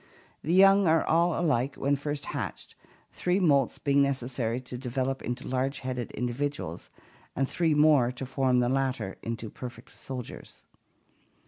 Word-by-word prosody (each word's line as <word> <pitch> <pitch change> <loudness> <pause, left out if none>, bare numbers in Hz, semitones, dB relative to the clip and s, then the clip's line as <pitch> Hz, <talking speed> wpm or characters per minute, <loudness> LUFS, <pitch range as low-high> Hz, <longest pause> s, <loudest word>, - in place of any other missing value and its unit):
The 160 - -2
young 195 0 +6
are 160 0 +4
all 170 +1 +2
alike 140 -5 +1
when 140 +1 +1
first 145 0 -4
hatched, - - -5 0.4
three 180 +2 0
moults 140 -8 +3
being 140 -1 +2
necessary 125 -3 -1
to 125 0 -7
develop 130 +1 -2
into 125 +1 -4
large 130 +2 -1
headed 125 -2 -4
individuals, 125 - -3 0.5
and 135 0 +1
three 165 -1 +1
more 150 -5 +5
to 130 +1 -6
form 130 -1 +2
the 120 - +2
latter 130 -7 -1
into 115 -1 -5
perfect 125 0 -9
soldiers. 125 -3 -8
135 Hz, 145 wpm, -28 LUFS, 125-145 Hz, 0.5 s, young